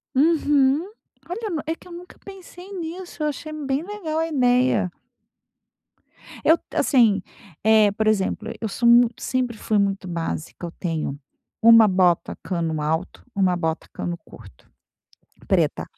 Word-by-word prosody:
Uhum. 290 +1 +3 0.4
Olha 430 +5 -4
nu 325 -5 -2
é 320 - -1
que 330 - -15
eu - - -13
nunca 350 +1 -11
pensei 375 -1 -12
nisso, 350 -2 -6
eu - - +1
achei 310 +1 -5
bem 280 -2 -2
legal 340 -4 -4
a 325 - 0
ideia. 250 - +2 1.5
Eu 320 - +5
t - - -17
assim, 225 -8 +3 0.4
eh, 215 -1 +5
por 215 +2 -1
exemplo, 215 +1 0
eu 225 - -2
sou 235 +3 0
mui 240 0 +7
sempre 250 -3 -2
fui 215 0 0
muito 200 -1 0
básica. 170 0 -4
Eu 170 - -6
tenho 160 -5 -3 0.4
uma 230 -1 +8
bota 185 -3 +2
cano 165 -4 -2
alto, 160 +5 -3
uma 190 -2 +2
bota 160 -2 -3
cano 175 0 -4
curto 100 -4 -16 0.8
preta, - - +1
235 Hz, 145 wpm, -23 LUFS, 185-315 Hz, 1.5 s, uma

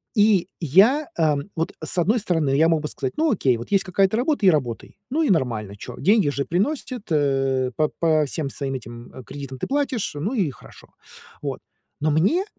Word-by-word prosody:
И 205 -4 +4
я, 210 - +4
эм, 150 +1 +1
вот 165 - -1
с 165 - -4
одной 210 +8 +2
стороны 160 -8 0
я 160 +3 +4
мог 160 -2 +2
бы 150 - -3
сказать: 130 -3 -4
"Ну, 315 -2 +2
окей, 130 - +2
вот 120 - -9
есть 195 -1 +3
какая-то 190 +2 +1
работа 260 -4 +1
и - - +8
работай! 130 -8 -2
Ну, 315 +5 +1
и 290 - +1
нормально, 115 - 0
чё. 105 - -9
Деньги 200 -5 +3
же 140 -1 -2
приносит, 230 - -2
э, 135 -3 +1
по 155 -1 +1
по 155 -2 +3
всем 145 0 -4
своим 135 -1 -4
этим, 120 -1 -9
м, 130 - -10
кредитам 135 +1 -8
ты - - -3
платишь, 270 - -1
ну 190 - -2
и 190 - +1
хорошо!" - - -16 0.5
Вот. - - -4 0.4
Но 155 0 +2
мне 205 - +2
160 Hz, 200 wpm, -23 LUFS, 135-205 Hz, 0.5 s, и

